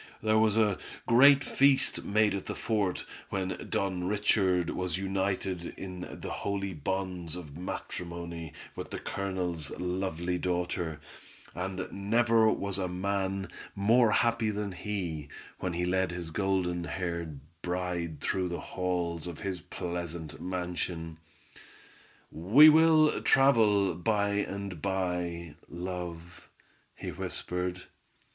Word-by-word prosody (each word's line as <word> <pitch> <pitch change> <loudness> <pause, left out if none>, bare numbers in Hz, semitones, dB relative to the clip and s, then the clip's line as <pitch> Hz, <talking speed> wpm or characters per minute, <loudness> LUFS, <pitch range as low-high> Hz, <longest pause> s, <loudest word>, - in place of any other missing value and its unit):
There 110 0 +4
was 110 -1 +3
a 105 -3 +3 0.3
great 140 +4 +7
feast 140 0 +3
made 105 0 +3
at 100 - -4
the - - -3
fort, 105 -5 0 0.2
when 95 -1 -3
Don 95 -2 -1
Richard 95 -3 +2
was 90 -2 -2
united 95 -2 -2
in 90 -1 -6
the - - -5
"holy 100 -1 -2
bonds 90 0 -3
of 75 -5 -8
matrimony" 85 -1 -5 0.2
with - - -6
the - - -4
Colonel's 90 -6 -3
lovely 90 -1 -1
daughter, 90 -3 -1 0.5
and 95 +1 -3
never 110 +2 +3
was 100 -2 -1
man 95 +1 -1 0.3
more 115 +4 +5
happy 115 0 +2
than 105 -1 -2
he, 90 -5 -4 0.3
when 90 -2 -2
he 90 +1 0
led 95 +1 +1
his 85 -2 -5
golden 90 -1 0
haired 85 -5 -3 0.2
bride 90 -4 -2
through 95 -1 0
the 85 - -3
halls 90 -2 -2
of 85 -3 -7
his 95 -3 -3
pleasant 85 -3 -5
mansion. 90 -2 -3 1.1
"We 110 - +8
will 155 0 +5
travel 110 -8 +5
by 100 +4 +1
and 100 -4 -3
by, 90 -4 -2 0.2
love," 90 -1 -6 0.5
he - - -5
whispered. 90 0 -3
90 Hz, 120 wpm, -30 LUFS, 85-100 Hz, 1.1 s, We